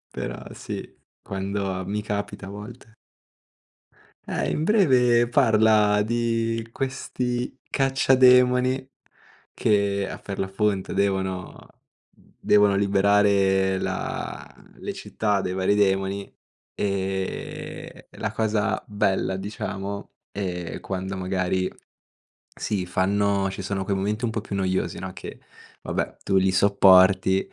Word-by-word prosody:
Però -, -, -5 dB
sì, -, -, -6 dB, 0.4 s
quando 95 Hz, -1 st, -3 dB
mi 105 Hz, +2 st, -2 dB
capita 105 Hz, -1 st, -4 dB
a -, -, -8 dB
volte. 105 Hz, +2 st, -10 dB, 1.3 s
Eh, -, -, -1 dB
in 155 Hz, -, -1 dB
breve 125 Hz, -, +4 dB
parla 110 Hz, -4 st, +4 dB
di 115 Hz, 0 st, -1 dB
questi 125 Hz, -1 st, -3 dB
cacciademoni 130 Hz, -1 st, +4 dB, 0.6 s
che 100 Hz, -2 st, +1 dB
a -, -, -6 dB
Ferlafonte 95 Hz, 0 st, -2 dB
devono 95 Hz, -2 st, -2 dB, 0.7 s
devono 105 Hz, -1 st, +4 dB
liberare 100 Hz, -1 st, +3 dB
la -, -, -4 dB, 0.3 s
le -, -, -5 dB
città 105 Hz, -2 st, -1 dB
dai 90 Hz, -, -3 dB
vari 95 Hz, +2 st, +1 dB
demoni, 95 Hz, 0 st, 0 dB, 0.4 s
e 95 Hz, -1 st, -4 dB
la 110 Hz, -, -4 dB
cosa 110 Hz, -1 st, 0 dB
bella, 95 Hz, -2 st, 0 dB
diciamo, 100 Hz, 0 st, -5 dB, 0.2 s
è 90 Hz, -3 st, -4 dB
quando 95 Hz, 0 st, -4 dB
magari 95 Hz, 0 st, -1 dB, 0.8 s
si 95 Hz, -4 st, -2 dB
fanno 100 Hz, +2 st, +1 dB
ci 95 Hz, +1 st, -6 dB
sono 95 Hz, 0 st, -2 dB
quei 100 Hz, +1 st, -1 dB
momenti 105 Hz, +4 st, -2 dB
un 115 Hz, -, -1 dB
po' 110 Hz, -, -2 dB
più 100 Hz, -, -6 dB
noiosi, 95 Hz, -1 st, -1 dB
no, 95 Hz, +1 st, -5 dB
che 90 Hz, -, -9 dB, 0.4 s
vabbè, -, -, -3 dB
tu 95 Hz, -, +2 dB
li 95 Hz, 0 st, +3 dB
sopporti, 95 Hz, -1 st, +5 dB
100 Hz, 110 wpm, -24 LUFS, 95-110 Hz, 1.3 s, sopporti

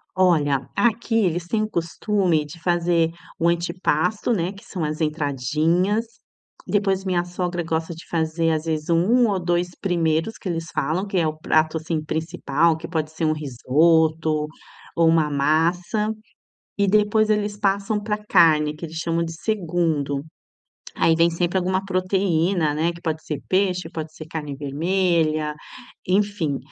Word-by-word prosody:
Olha, 150 Hz, -7 st, +2 dB
aqui 235 Hz, 0 st, +1 dB
eles 175 Hz, -5 st, +1 dB
têm 215 Hz, +3 st, 0 dB
o 215 Hz, -, -1 dB
costume 170 Hz, -1 st, 0 dB
de 160 Hz, +3 st, -12 dB
fazer 170 Hz, -1 st, +2 dB, 0.3 s
o 170 Hz, -, +2 dB
antipasto, 170 Hz, +4 st, 0 dB
né, 180 Hz, -2 st, 0 dB
que 200 Hz, -, -14 dB
são 175 Hz, -5 st, -4 dB
as 155 Hz, +1 st, -3 dB
entradinhas. 155 Hz, -, +1 dB, 0.6 s
Depois 195 Hz, -2 st, +1 dB
minha 180 Hz, -2 st, 0 dB
sogra 175 Hz, 0 st, -3 dB
gosta 160 Hz, +1 st, -2 dB
de 165 Hz, -, -12 dB
fazer 165 Hz, 0 st, 0 dB
às 155 Hz, 0 st, 0 dB
vezes 155 Hz, 0 st, -2 dB
1 220 Hz, +8 st, +4 dB
ou 195 Hz, -2 st, 0 dB
2 175 Hz, 0 st, 0 dB
primeiros 165 Hz, +2 st, 0 dB
que 190 Hz, -, -7 dB
eles 165 Hz, -1 st, -3 dB
falam, 170 Hz, +8 st, -1 dB
que 195 Hz, -, -3 dB
é 165 Hz, -, +2 dB
o 155 Hz, 0 st, -3 dB
prato 155 Hz, 0 st, +1 dB
assim 155 Hz, -1 st, -3 dB
principal 160 Hz, 0 st, 0 dB
que 165 Hz, +1 st, -8 dB
pode 155 Hz, -2 st, -2 dB
ser 160 Hz, 0 st, -3 dB
um 155 Hz, -, +3 dB
risoto 155 Hz, +2 st, +2 dB, 0.5 s
ou 165 Hz, -1 st, +4 dB
uma 160 Hz, -2 st, +3 dB
massa, 170 Hz, +9 st, +1 dB, 0.7 s
e 200 Hz, -1 st, +2 dB
depois 215 Hz, +2 st, +3 dB
eles 210 Hz, -1 st, 0 dB
passam 200 Hz, +1 st, 0 dB
pra 210 Hz, 0 st, -1 dB
carne 160 Hz, -7 st, +3 dB
que 165 Hz, -, -7 dB
eles 160 Hz, +1 st, -8 dB
chamam 165 Hz, 0 st, 0 dB
de 165 Hz, -, -4 dB
segundo, 165 Hz, -7 st, -1 dB, 0.7 s
aí 165 Hz, -, +3 dB
vem 170 Hz, +1 st, +3 dB
sempre 175 Hz, +2 st, -1 dB
alguma 185 Hz, +1 st, 0 dB
proteína, 185 Hz, -4 st, +1 dB
né? 165 Hz, +3 st, 0 dB
Que 170 Hz, -, -13 dB
pode 160 Hz, -2 st, -3 dB
ser 150 Hz, -3 st, -4 dB
peixe, 185 Hz, -1 st, +1 dB
pode 160 Hz, -1 st, -6 dB
ser 155 Hz, -, -9 dB
carne 150 Hz, -4 st, -5 dB
vermelha, 155 Hz, 0 st, 0 dB, 0.5 s
enfim. 190 Hz, -7 st, 0 dB
170 Hz, 155 wpm, -23 LUFS, 155-185 Hz, 0.7 s, 1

